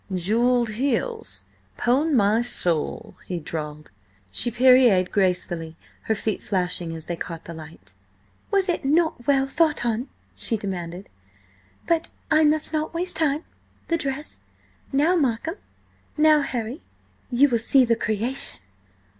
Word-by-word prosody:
"Jewelled 230 +6 +2
heels, 280 - -2 0.3
pon 275 +5 +2
my 215 0 +3
soul!" 175 -10 0
he 180 -2 -3
drawled. 150 -3 -6 0.4
She 100 - +2
pirouetted 240 -6 +5
gracefully, 175 -4 -1 0.3
her 220 - +1
feet 215 0 -3
flashing 180 -4 -1
as 160 - -9
they 175 - -3
caught 165 -1 -7
the 170 - -7
light. 160 0 -11 0.6
"Was 395 -2 +2
it 350 -4 -1
not 300 -3 +1
well 270 -1 +3
thought 305 -1 +1
on?" 235 +3 -1 0.2
she 225 - +2
demanded. 185 -2 -5 0.8
"But 335 -1 +2 0.2
I 310 0 +5
must 310 +1 +1
not 310 +1 -2
waste 350 -1 0
time–the 315 +2 -3
dress! 280 0 -5 0.5
Now, 300 +6 +3
Markham–now 305 - 0
Harry–you 255 +1 -2
will 235 -2 +1
see 255 +3 +4
the 230 -1 +2
creation!" 225 +4 -2
240 Hz, 125 wpm, -24 LUFS, 185-300 Hz, 0.8 s, pirouetted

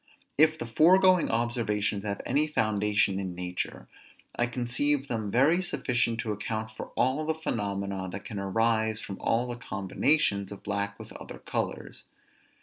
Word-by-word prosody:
If 155 +2 +4
the 140 - -5
foregoing 180 +8 +5
observations 110 -3 0
have 100 -1 -2
any 145 +5 +2
foundation 105 -6 +1
in 95 -2 -4
nature, 90 0 -4 0.5
I 120 - +1
conceive 130 +4 0
them 110 -4 -2
very 145 - +4
sufficient 120 -9 0
to 115 -2 -3
account 110 +1 -3
for 110 - -7
all 130 +4 +2
the 160 +1 -1
phenomena 100 -9 -3
that 100 - -7
can 105 -4 -5
arise 110 +2 +1
from 100 - -7
all 120 +2 +1
the 120 0 -5
combinations 100 0 +1
of 100 - -9
black 100 0 -2
with - - -11
other - - -9
colors. - - -4
115 Hz, 150 wpm, -28 LUFS, 100-130 Hz, 0.5 s, foregoing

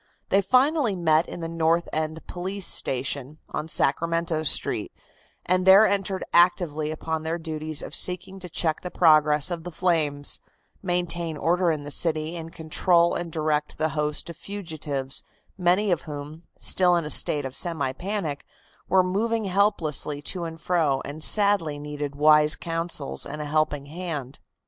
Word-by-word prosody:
They 195 - +4
finally 255 - +2
met 160 -2 +2
in 175 - -7
the 165 - -3
North 165 +1 +1
End 155 +1 -3
Police 190 +2 -4
Station, 135 +2 -2
on 155 - -4
Sacramento 165 +2 +1
Street, 155 - +2 0.5
and 185 +1 +2
there 190 +3 +8
entered 195 -2 -1
actively 170 -3 +3
upon 160 0 -3
their 160 +2 -2
duties 155 -2 -4
of - - -8
seeking 185 +1 0
to 180 -1 -8
check 160 -1 0
the 180 - -5
progress 155 -2 +4
of 170 -2 -4
the 175 - -6
flames, 155 -5 0 0.4
maintain 175 -3 -2
order 175 +3 +1
in 155 -3 -1
the 145 - -8
city 160 +1 0
and 165 -1 -7
control 170 +2 +2
and 170 -1 -4
direct 155 -1 -1
the 155 - 0
host 150 +1 -2
of 165 - -13
fugitives, 155 -9 -4 0.3
many 185 +2 +2
of 170 - +1
whom, 150 +2 -8
still 180 -1 +4
in 170 -2 0
a 150 - -5
state 145 -2 +2
of 130 0 -6
semi 160 -7 -1
panic, 175 -4 -4 0.5
were 190 -1 +5
moving 220 +4 -1
helplessly 170 -7 +1
to 175 +2 -2
and 165 0 -7
fro 160 -7 +1
and 155 +2 -6
sadly 200 -8 +2
needed 145 -1 -5
wise 150 +1 +5
counsels 165 - -4
and 150 +2 -7
a 150 - -4
helping 150 -1 0
hand. 150 -4 -6
165 Hz, 160 wpm, -25 LUFS, 150-180 Hz, 0.5 s, there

